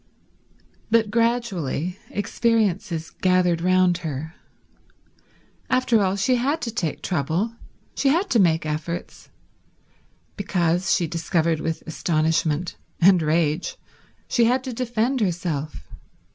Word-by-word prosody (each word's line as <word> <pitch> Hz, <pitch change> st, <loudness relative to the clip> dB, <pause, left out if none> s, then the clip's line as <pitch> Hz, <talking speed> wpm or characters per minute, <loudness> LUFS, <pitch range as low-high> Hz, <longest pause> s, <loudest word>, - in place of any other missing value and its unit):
But 220 Hz, -2 st, +3 dB
gradually 210 Hz, -, 0 dB
experiences 200 Hz, -6 st, 0 dB
gathered 180 Hz, -2 st, +2 dB
round 185 Hz, -1 st, +3 dB
her. 160 Hz, -1 st, -5 dB, 1.4 s
After 255 Hz, -3 st, +3 dB
all, 190 Hz, 0 st, +1 dB
she 250 Hz, +6 st, +2 dB
had 280 Hz, +6 st, 0 dB
to 235 Hz, -, -2 dB
take 180 Hz, -9 st, -3 dB
trouble, 175 Hz, -, -1 dB, 0.4 s
she 275 Hz, -, +1 dB
had 345 Hz, +8 st, +2 dB
to 235 Hz, -, +4 dB
make 165 Hz, -4 st, +3 dB
efforts, 155 Hz, +3 st, -5 dB, 1.1 s
because, 175 Hz, -3 st, 0 dB
she 175 Hz, -, 0 dB
discovered 165 Hz, 0 st, 0 dB
with 160 Hz, 0 st, -3 dB
astonishment 160 Hz, 0 st, 0 dB, 0.2 s
and 185 Hz, 0 st, +6 dB
rage, 155 Hz, +1 st, 0 dB, 0.5 s
she 235 Hz, -, +3 dB
had 255 Hz, +3 st, +2 dB
to 260 Hz, -2 st, -5 dB
defend 240 Hz, +1 st, -1 dB
herself. 165 Hz, -6 st, -2 dB
180 Hz, 110 wpm, -23 LUFS, 165-230 Hz, 1.4 s, and